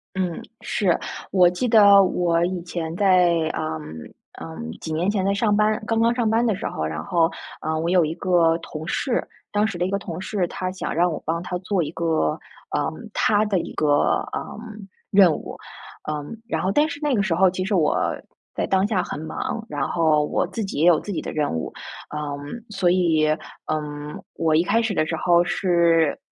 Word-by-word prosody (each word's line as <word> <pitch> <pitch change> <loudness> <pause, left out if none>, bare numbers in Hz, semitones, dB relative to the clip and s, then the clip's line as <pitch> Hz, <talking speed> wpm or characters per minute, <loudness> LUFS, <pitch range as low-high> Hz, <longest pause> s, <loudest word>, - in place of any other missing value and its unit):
嗯， 180 -3 -2 0.2
是。 185 -5 +1 0.3
我 180 -2 +6
记 180 +8 -2
得 205 -3 +7
我 175 -2 +1
以 180 -1 -3
前 170 -2 -4
在， 180 -2 +4 0.2
呃， - - -2 0.8
呃， 80 0 -8 0.2
几 160 - -5
年 170 +5 0
前 205 -2 0
在 200 - +2
上 205 0 +2
班 215 +1 +2
刚 225 0 0
刚 230 +1 +3
上 235 -2 +1
班 225 +2 +2
的 220 -4 +2
时 195 - -6
候， - - -4
然 80 0 -4
后， 165 - +2 0.3
呃， 155 0 -1
我 165 +1 -1
有 180 -1 +4
一 155 - -2
个 170 -3 +3
同 160 -1 -8
事， 255 -3 -1 0.3
当 205 0 +2
时 205 -5 -5
的 175 - 0
一 - - -2
个 200 - 0
同 170 -3 -6
事， 190 -1 -1
他 185 +2 -4
想 185 - -4
让 175 +2 +2
我 155 - -5
帮 165 +2 -1
他 180 - -4
做 185 -1 0
一 150 - -5
个， 160 - 0 0.4
呃， - - 0 0.2
他 210 0 +2
的 200 -3 +1
一 - - -6
个， 155 - 0 0.5
呃， - - -5 0.5
任 195 -4 +6
务。 - - -7 0.5
呃， 150 -1 -2 0.2
然 - - -1
后 190 - 0
但 295 +9 +3
是 285 -1 -6
那 295 -2 +1
个 215 - +2
时 190 -5 0
候， 190 +1 +4
其 185 +1 -3
实 200 +2 0
我 160 -4 +2 0.6
在 - - 0
当 190 +1 +2
下 200 -5 0
很 - - -5
忙， 160 +7 -4
然 145 -2 -2
后 155 -3 +2
我 175 - 0
自 200 +5 -4
己 190 - -4
也 165 - +4
有 165 -3 +6
自 205 - -6
己 175 - -2
的 - - -5
任 150 -2 -1
务。 80 -1 -3 0.4
呃， 150 - -6 0.5
所 195 -3 +1
以， 170 -4 +3 0.4
嗯， 150 -1 -4 0.2
我 160 -1 +1
一 165 - +4
开 225 +5 +2
始 225 -2 -1
的 155 -4 +1
时 165 - -2
候 175 +1 +4
是 170 -4 +2
180 Hz, 225 characters per minute, -23 LUFS, 160-200 Hz, 0.8 s, 得